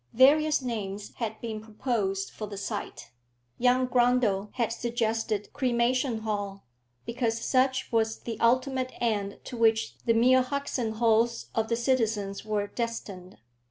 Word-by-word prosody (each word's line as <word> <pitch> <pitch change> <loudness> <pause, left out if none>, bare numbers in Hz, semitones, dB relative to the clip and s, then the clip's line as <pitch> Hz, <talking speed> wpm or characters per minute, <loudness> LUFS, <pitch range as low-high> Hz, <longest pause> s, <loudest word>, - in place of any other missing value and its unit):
Various 295 +3 +5
names 210 -4 -4
had 220 -2 -3
been 220 -2 -4
proposed 210 -3 -2
for 215 - -6
the 200 -1 -7
site. 195 - -5 0.5
Young 250 +1 +4
Grundle 240 -5 +2
had 235 -3 0
suggested 225 -3 -2
Cremation 245 -1 +1
Hall, 205 -2 -4 0.4
because 230 - -1
such 260 +2 +1
was 220 -1 +1
the 230 -2 -5
ultimate 255 +2 +1
end 205 -4 -1
to - - -7
which 225 -1 +2
the 230 - +3
mere 255 +3 +5
husks 280 +1 -3
and 220 -2 -2
hulls 230 +1 +2
of 225 0 0
the 230 - +1
citizens 225 -5 0
were 210 -1 -1
destined. 205 -5 -5
230 Hz, 140 wpm, -28 LUFS, 215-250 Hz, 0.5 s, Various